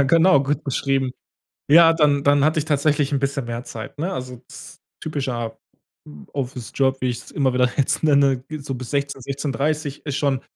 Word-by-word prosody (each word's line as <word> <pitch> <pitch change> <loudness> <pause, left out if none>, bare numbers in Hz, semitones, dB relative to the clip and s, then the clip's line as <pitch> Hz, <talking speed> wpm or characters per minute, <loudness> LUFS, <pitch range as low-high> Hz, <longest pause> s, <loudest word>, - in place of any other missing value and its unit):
Ja, - - +6
genau, 160 0 +5
gut 145 +2 -2
beschrieben. 135 -1 0 0.6
Ja, 165 +1 +8
dann 150 -3 +2
dann 145 0 +4
hatte 155 +1 +2
ich 150 - 0
tatsächlich 145 -1 +1
'n 140 - +2
bisschen 140 -1 -1
mehr 120 +1 -5
Zeit, 110 +5 -8
ne? 180 +5 -2
Also, 125 -4 -6
das - - -12 0.2
typischer 125 -7 -3 0.8
Office-Job, 130 0 -1
wie 130 - 0
ich's 120 0 -7
immer 135 -3 +1
wieder 125 0 +3
jetzt 140 +2 +1
nenne, 140 -4 +3
ge 155 0 -5
so 135 -1 -5
bis 125 -1 -7
16:00 140 -1 -2
16:30 145 +2 -2
ist 145 -1 -2
schon 140 -2 0
140 Hz, 180 wpm, -22 LUFS, 130-145 Hz, 0.8 s, Ja